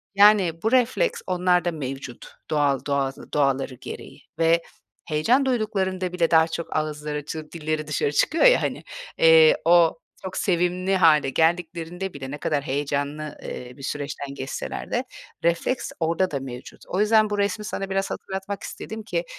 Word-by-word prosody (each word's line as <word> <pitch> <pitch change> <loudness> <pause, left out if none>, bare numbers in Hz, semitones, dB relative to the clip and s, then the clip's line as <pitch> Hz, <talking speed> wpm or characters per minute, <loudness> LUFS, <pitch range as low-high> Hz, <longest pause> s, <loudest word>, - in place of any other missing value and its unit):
Yani, 195 -5 +5
bu 220 - +1
refleks 255 - +2
onlarda 180 -1 +2
mevcut 135 -5 -6 0.2
doğal 145 -3 +2
doğa 140 -1 +1 0.2
doğaları 135 -2 +1
gereği - - -10 0.2
ve 165 +1 +4 0.4
heyecan 225 - +2
duyduklarında 195 -7 -1
bile 170 -2 +1
daha 160 -1 +6
çok 165 0 -5
ağızları, 150 -1 -3
çı 155 0 -7
dilleri 155 -2 -3
dışarı 145 -1 0
çıkıyor 320 - +2
ya - - +6
hani. - - -3 0.3
Eee, 160 -1 +7
o 170 -1 +5 0.2
çok 190 -1 -5
sevimli 180 +1 +1
hâle 155 -6 +5
geldiklerinde 170 +4 -1
bile 135 -2 -7
ne 145 - -5
kadar 145 -1 -1
heyecanlı, 145 +2 -3
eee, 125 0 -7
bir 135 - -11
süreçten 140 0 -4
geçseler 135 0 -5
de - - 0 0.4
refleks 170 +9 0
orada 170 +3 +1
da 140 - -2
mevcut. 125 -2 -9
O 185 - -2
yüzden 215 0 +4
bu 205 - -2
resmi 205 +1 -1
sana 195 -1 -4
biraz 195 0 -1
hatırlatmak 195 +1 -5
istedim 220 0 -7
ki, 175 -5 -2
165 Hz, 155 wpm, -24 LUFS, 150-190 Hz, 0.4 s, Eee